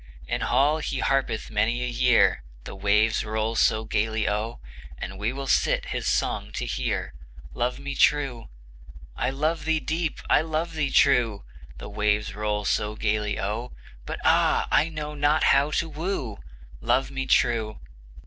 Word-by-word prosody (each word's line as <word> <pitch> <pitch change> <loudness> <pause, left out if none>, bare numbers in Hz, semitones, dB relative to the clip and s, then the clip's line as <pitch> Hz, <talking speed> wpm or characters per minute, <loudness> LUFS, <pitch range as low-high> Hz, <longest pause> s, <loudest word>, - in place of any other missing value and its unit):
In - - -2
hall 145 +5 +2
he 145 -2 -3
harpeth 135 -5 0
many 115 +3 +1
a - - -1
year, 125 - +3 0.2
The - - -8
waves 105 +3 +2
roll 110 +1 -2
so 110 0 +2
gayly 110 0 0
O, 105 +3 -2 0.4
And 95 +5 -7
we 105 +3 0
will 135 +1 -5
sit - - +1
his - - -3
song - - 0
to - - -3
hear, - - -2 0.4
Love 125 +1 -1
me 140 0 -5
true! 135 -6 +1 0.7
"I 125 - 0
love 155 +5 -1
thee 160 0 +1
deep, 160 0 -2
I - - +4
love 160 +1 -2
thee 150 -3 -1
true," 125 - +3 0.3
The - - -8
waves 105 0 0
roll 105 0 -2
so 105 +2 0
gayly 105 -1 -1
O, 110 +5 -3 0.3
"But - - -4
ah! - - +3
I 160 - +3
know 150 -2 -5
not 145 +1 +2
how 140 +2 +4
to 165 +2 0
woo," 155 - -4 0.4
Love 135 +1 +1
me 135 -1 -3
true! 115 -4 +2
125 Hz, 160 wpm, -25 LUFS, 105-145 Hz, 0.7 s, I